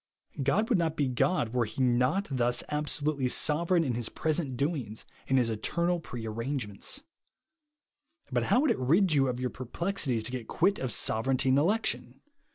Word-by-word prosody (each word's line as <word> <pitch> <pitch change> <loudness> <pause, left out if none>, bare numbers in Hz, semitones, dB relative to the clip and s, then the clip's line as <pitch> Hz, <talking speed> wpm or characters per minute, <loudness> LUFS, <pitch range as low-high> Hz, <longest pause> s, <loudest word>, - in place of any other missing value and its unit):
God 190 +12 +1
would 225 -7 +2
not 160 -2 0
be 145 - +1
God 125 +1 +1
were 125 -2 +1
he 110 +4 -9
not 125 +9 +2
thus 120 -2 +2
absolutely 150 -2 -1
sovereign 170 +6 +2
in 130 -5 -1
his 115 -1 -2
present 150 -4 -1
doings 135 -7 -3 0.2
and 135 - +2
his 120 -3 +2
eternrd 170 +10 -1
pre 120 -7 -7
arrang^jments. 115 - -3 1.3
But - - 0
how 250 - +3
would 300 -4 +3
it - - -1
rid 165 +8 +3
you 135 -2 +3
of 125 -1 -2
your 125 -1 -2
per 130 - -8
plexities 150 - -1
to 125 - -1
get 125 -3 -5
quit 195 +4 +1
of 130 -2 -2
sovereignty 130 +6 +1
and 130 +2 +4
election? 205 +9 -1
135 Hz, 175 wpm, -29 LUFS, 125-170 Hz, 1.3 s, and